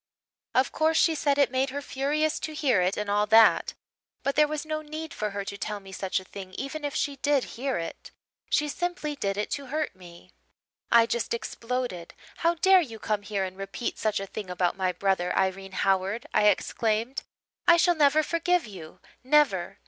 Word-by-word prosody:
Of 260 Hz, 0 st, +3 dB
course, 320 Hz, +1 st, +2 dB
she 325 Hz, -, +4 dB
said 285 Hz, -2 st, +1 dB
it 280 Hz, -3 st, +3 dB
made 265 Hz, +1 st, +1 dB
her 280 Hz, +2 st, -4 dB
furious 290 Hz, +3 st, -1 dB
to 310 Hz, -, -5 dB
hear 260 Hz, -10 st, +2 dB
it 180 Hz, +2 st, 0 dB
and 210 Hz, -, -2 dB
all 205 Hz, +1 st, +1 dB
that 225 Hz, +1 st, +5 dB, 0.5 s
but 275 Hz, +1 st, 0 dB
there 300 Hz, 0 st, +5 dB
was 305 Hz, 0 st, -4 dB
no 310 Hz, 0 st, -3 dB
need 310 Hz, +1 st, -7 dB
for 210 Hz, -, -2 dB
her 200 Hz, -1 st, -5 dB
to 200 Hz, 0 st, -6 dB
tell 210 Hz, +1 st, -3 dB
me 195 Hz, -1 st, -13 dB
such 190 Hz, 0 st, -2 dB
a -, -, -12 dB
thing 185 Hz, 0 st, -10 dB
even 285 Hz, +3 st, -5 dB
if 290 Hz, -1 st, -3 dB
she 285 Hz, -1 st, -1 dB
did 280 Hz, -1 st, +2 dB
hear 265 Hz, +2 st, -2 dB
it. 165 Hz, -1 st, -6 dB, 0.4 s
She 295 Hz, -, +2 dB
simply 330 Hz, -1 st, -3 dB
did 200 Hz, -7 st, -2 dB
it 210 Hz, -, -2 dB
to 280 Hz, -2 st, -3 dB
hurt 300 Hz, -3 st, -2 dB
me. 180 Hz, -1 st, -15 dB, 0.6 s
"I 230 Hz, -1 st, +7 dB
just 235 Hz, 0 st, -1 dB
exploded. 235 Hz, -7 st, -4 dB, 0.2 s
'How 335 Hz, +1 st, +2 dB
dare 380 Hz, +2 st, +5 dB
you 235 Hz, -9 st, -6 dB
come 210 Hz, -1 st, -2 dB
here 205 Hz, -1 st, -2 dB
and 185 Hz, 0 st, -5 dB
repeat 195 Hz, +5 st, -5 dB
such 215 Hz, -2 st, 0 dB
a 195 Hz, -, -4 dB
thing 195 Hz, 0 st, -7 dB
about 180 Hz, -1 st, 0 dB
my 190 Hz, -1 st, 0 dB
brother, 180 Hz, -1 st, 0 dB
Irene 190 Hz, 0 st, -1 dB
Howard?' 195 Hz, +4 st, +1 dB
I 210 Hz, -, +4 dB
exclaimed. 220 Hz, +4 st, 0 dB, 0.5 s
'I 340 Hz, -, +8 dB
shall 350 Hz, +1 st, +4 dB
never 300 Hz, 0 st, +4 dB
forgive 340 Hz, +2 st, +1 dB
you 180 Hz, -7 st, -11 dB, 0.2 s
never. 260 Hz, -10 st, +2 dB
235 Hz, 200 wpm, -27 LUFS, 195-295 Hz, 0.6 s, I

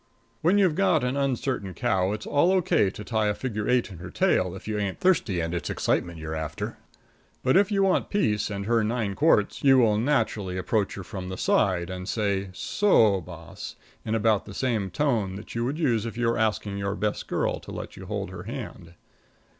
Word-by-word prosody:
When 175 Hz, +6 st, +4 dB
you've 190 Hz, -5 st, +4 dB
got 165 Hz, -5 st, +2 dB
an 125 Hz, +2 st, 0 dB
uncertain 130 Hz, -8 st, -1 dB
cow 100 Hz, -6 st, +1 dB
it's 105 Hz, -, -4 dB
all 155 Hz, +6 st, +3 dB
O.K. 170 Hz, -, +3 dB
to 105 Hz, -, -8 dB
tie 110 Hz, -1 st, 0 dB
a 105 Hz, -, 0 dB
figure 105 Hz, -4 st, -3 dB
eight 125 Hz, -3 st, +2 dB
in 90 Hz, -, -10 dB
her 90 Hz, 0 st, -8 dB
tail, 90 Hz, +1 st, +1 dB
if 95 Hz, -, -10 dB
you 105 Hz, -1 st, -1 dB
ain't 100 Hz, -2 st, -2 dB
thirsty, 150 Hz, -, +2 dB
and 80 Hz, 0 st, -2 dB
it's 85 Hz, -, -3 dB
excitement 85 Hz, -1 st, -1 dB
you're 80 Hz, 0 st, -5 dB
after; 80 Hz, -1 st, -4 dB, 0.6 s
but 130 Hz, -, +3 dB
if 200 Hz, +2 st, +4 dB
you 195 Hz, -1 st, +2 dB
want 190 Hz, -1 st, +2 dB
peace 105 Hz, -, +1 dB
and 100 Hz, -1 st, -4 dB
her 115 Hz, 0 st, +2 dB
nine 110 Hz, -2 st, -1 dB
quarts, 125 Hz, -6 st, +2 dB
you 135 Hz, -1 st, +6 dB
will 110 Hz, -4 st, +4 dB
naturally 110 Hz, -8 st, 0 dB
approach 100 Hz, +2 st, 0 dB
her 100 Hz, -, -6 dB
from 90 Hz, 0 st, -6 dB
the 95 Hz, -, -5 dB
side, 90 Hz, -3 st, +1 dB
and 90 Hz, +1 st, -5 dB
say, 100 Hz, -3 st, -1 dB
So 110 Hz, -, +3 dB
boss, -, -, -9 dB, 0.3 s
in 110 Hz, -, -1 dB
about 110 Hz, -2 st, +2 dB
the 100 Hz, -, -10 dB
same 115 Hz, -7 st, 0 dB
tone 110 Hz, -, 0 dB
that 105 Hz, -, -9 dB
you 115 Hz, -, -1 dB
would 140 Hz, +5 st, -2 dB
use 120 Hz, -9 st, +1 dB
if 115 Hz, -, -7 dB
you 120 Hz, -1 st, +1 dB
were 115 Hz, -, 0 dB
asking 105 Hz, -2 st, 0 dB
your 100 Hz, 0 st, -2 dB
best 105 Hz, +1 st, -2 dB
girl -, -, -1 dB
to -, -, -11 dB
let -, -, -7 dB
you -, -, -10 dB
hold -, -, -3 dB
her 90 Hz, -2 st, -7 dB
hand. 105 Hz, -8 st, -7 dB
105 Hz, 210 wpm, -26 LUFS, 95-125 Hz, 0.6 s, you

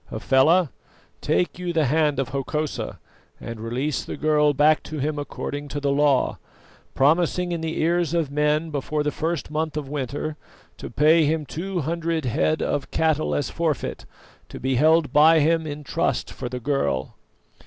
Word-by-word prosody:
Hafela, 155 Hz, +5 st, +3 dB, 0.5 s
take 180 Hz, -, 0 dB
you 175 Hz, -1 st, -3 dB
the 160 Hz, -2 st, +2 dB
hand 150 Hz, +1 st, +2 dB
of 135 Hz, -1 st, -1 dB
Hokosa 140 Hz, +3 st, -3 dB, 0.4 s
and 115 Hz, -1 st, -7 dB
release 125 Hz, +6 st, -2 dB
the -, -, -6 dB
girl 150 Hz, 0 st, +3 dB
back 150 Hz, +2 st, +3 dB
to 155 Hz, -, -7 dB
him 150 Hz, +1 st, -2 dB
according 145 Hz, 0 st, -5 dB
to 145 Hz, -, -4 dB
the 140 Hz, -1 st, 0 dB
law, 140 Hz, -1 st, +2 dB, 0.6 s
promising 175 Hz, +5 st, +2 dB
in 170 Hz, -1 st, -2 dB
the 160 Hz, 0 st, -3 dB
ears 170 Hz, 0 st, +1 dB
of 160 Hz, -5 st, 0 dB
men 150 Hz, +2 st, +1 dB
before 150 Hz, +1 st, -2 dB
the 150 Hz, -, 0 dB
first 165 Hz, 0 st, -3 dB
month 155 Hz, 0 st, -2 dB
of 150 Hz, -2 st, -4 dB
winter 145 Hz, +2 st, -4 dB, 0.4 s
to -, -, -7 dB
pay 155 Hz, +2 st, +4 dB
him 155 Hz, 0 st, 0 dB
two 180 Hz, +5 st, -4 dB
hundred 165 Hz, 0 st, -2 dB
head 155 Hz, +6 st, +1 dB
of 140 Hz, -, -2 dB
cattle 155 Hz, -1 st, +1 dB
as 145 Hz, -, -2 dB
forfeit, 160 Hz, -5 st, -2 dB, 0.4 s
to -, -, -8 dB
be 130 Hz, +1 st, -1 dB
held 155 Hz, +4 st, +3 dB
by 160 Hz, +2 st, +6 dB
him 160 Hz, +1 st, +2 dB
in 150 Hz, 0 st, -6 dB
trust -, -, -1 dB
for 125 Hz, -, -5 dB
the 125 Hz, -, -5 dB
girl." 90 Hz, -, -1 dB
150 Hz, 170 wpm, -23 LUFS, 140-160 Hz, 0.6 s, by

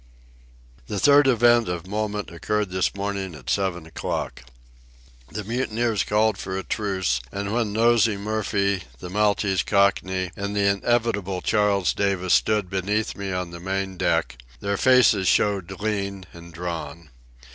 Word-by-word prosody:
The 105 Hz, -, -3 dB
third 145 Hz, +2 st, +6 dB
event 120 Hz, -3 st, +4 dB
of 90 Hz, -1 st, -4 dB
moment 105 Hz, 0 st, -3 dB
occurred 105 Hz, +3 st, -2 dB
this 95 Hz, +1 st, 0 dB
morning 100 Hz, -3 st, -3 dB
at 65 Hz, -4 st, -5 dB
seven 95 Hz, -4 st, -1 dB
o'clock. 80 Hz, -5 st, -4 dB, 0.9 s
The 105 Hz, -, -5 dB
mutineers 115 Hz, -1 st, -1 dB
called 105 Hz, -1 st, +1 dB
for 95 Hz, 0 st, -4 dB
a 95 Hz, -, -4 dB
truce; 95 Hz, -, -1 dB
and 100 Hz, +1 st, -3 dB
when 115 Hz, -3 st, 0 dB
Nosey 115 Hz, -1 st, +3 dB
Murphy, 100 Hz, -3 st, -1 dB
the 90 Hz, +7 st, -8 dB
Maltese 100 Hz, -2 st, +1 dB
Cockney, 95 Hz, -2 st, +1 dB
and 100 Hz, +1 st, -4 dB
the 100 Hz, -1 st, +2 dB
inevitable 100 Hz, -2 st, 0 dB
Charles 105 Hz, -3 st, +2 dB
Davis 95 Hz, -3 st, 0 dB
stood 105 Hz, -3 st, +2 dB
beneath 100 Hz, +3 st, -1 dB
me 100 Hz, -1 st, -4 dB
on 90 Hz, -2 st, -3 dB
the 85 Hz, -, -8 dB
main 95 Hz, +1 st, -3 dB
deck, 80 Hz, -, 0 dB, 0.2 s
their 100 Hz, 0 st, -1 dB
faces 120 Hz, -5 st, +4 dB
showed 100 Hz, -3 st, +2 dB
lean 100 Hz, -3 st, -3 dB
and 85 Hz, 0 st, -12 dB
drawn. 85 Hz, -2 st, -6 dB
100 Hz, 145 wpm, -24 LUFS, 95-105 Hz, 0.9 s, third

